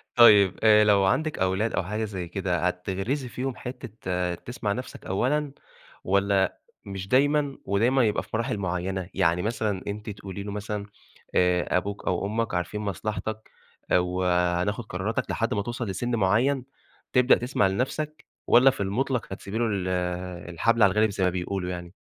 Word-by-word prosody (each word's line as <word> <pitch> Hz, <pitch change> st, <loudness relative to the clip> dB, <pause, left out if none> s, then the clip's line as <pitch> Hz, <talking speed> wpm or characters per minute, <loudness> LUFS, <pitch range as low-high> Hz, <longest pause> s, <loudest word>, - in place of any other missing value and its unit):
طيب، 105 Hz, -6 st, +7 dB
آآ، 105 Hz, -1 st, +7 dB
لو 100 Hz, -2 st, +4 dB
عندِك 155 Hz, +11 st, 0 dB
أولاد 95 Hz, +4 st, +1 dB
أو 95 Hz, -, 0 dB
حاجة 105 Hz, +5 st, -3 dB
زي 95 Hz, -4 st, -5 dB
كده، 90 Hz, -1 st, -1 dB
هتغرزي 95 Hz, +9 st, -2 dB
فيهم 130 Hz, +1 st, -3 dB
حتة 95 Hz, -8 st, -4 dB
تسمع 105 Hz, +2 st, -4 dB
نَفْسك 125 Hz, +4 st, -7 dB
أولًا 140 Hz, +9 st, 0 dB, 0.5 s
والَّا 100 Hz, 0 st, +2 dB, 0.3 s
مش 95 Hz, -1 st, -6 dB
دايمًا؟ 145 Hz, +3 st, +2 dB
ودايمًا 120 Hz, +7 st, +3 dB
يبقى 105 Hz, -, 0 dB
في -, -, -19 dB
مراحل 110 Hz, -1 st, -1 dB
معيّنة. 95 Hz, 0 st, -3 dB
يعني 90 Hz, -2 st, +2 dB
مثلًا 105 Hz, -2 st, -1 dB
أنتِ 105 Hz, +2 st, -5 dB
تقولي 100 Hz, -1 st, -7 dB
لُه 100 Hz, -, -5 dB
مثلًا 105 Hz, 0 st, -4 dB, 0.5 s
آآ، 90 Hz, 0 st, +3 dB
أبوك 100 Hz, +2 st, -4 dB
أو 90 Hz, +1 st, 0 dB
أمك 110 Hz, +1 st, -1 dB
عارفين 90 Hz, +4 st, -2 dB
مصلحتك 110 Hz, +2 st, -4 dB, 0.4 s
آآ، -, -, +6 dB
وهناخد 90 Hz, +3 st, 0 dB
قراراتك 100 Hz, +3 st, -2 dB
لحد 115 Hz, +2 st, 0 dB
ما 105 Hz, -, 0 dB
توصل 120 Hz, +3 st, -4 dB
لسِن 120 Hz, +6 st, -2 dB
معيّن، 120 Hz, +7 st, +2 dB, 0.5 s
تبدأ 125 Hz, 0 st, +6 dB
تسمع 120 Hz, -5 st, +1 dB
لنَفْسك 145 Hz, +9 st, -3 dB, 0.2 s
والَّا 125 Hz, +3 st, +7 dB
في 130 Hz, -, -6 dB
المطلق 120 Hz, +5 st, -1 dB
هتسيبي 100 Hz, +2 st, -6 dB
له 120 Hz, -, +1 dB
ال 100 Hz, -4 st, -1 dB, 0.6 s
الحبل 115 Hz, +6 st, +2 dB
على 100 Hz, -, +6 dB
الغارِب 105 Hz, +2 st, +3 dB
زي 95 Hz, -1 st, -2 dB
ما 90 Hz, -, +4 dB
بيقولوا 90 Hz, +1 st, -3 dB
يعني؟ 90 Hz, -1 st, -6 dB
100 Hz, 160 wpm, -26 LUFS, 95-120 Hz, 0.6 s, طيب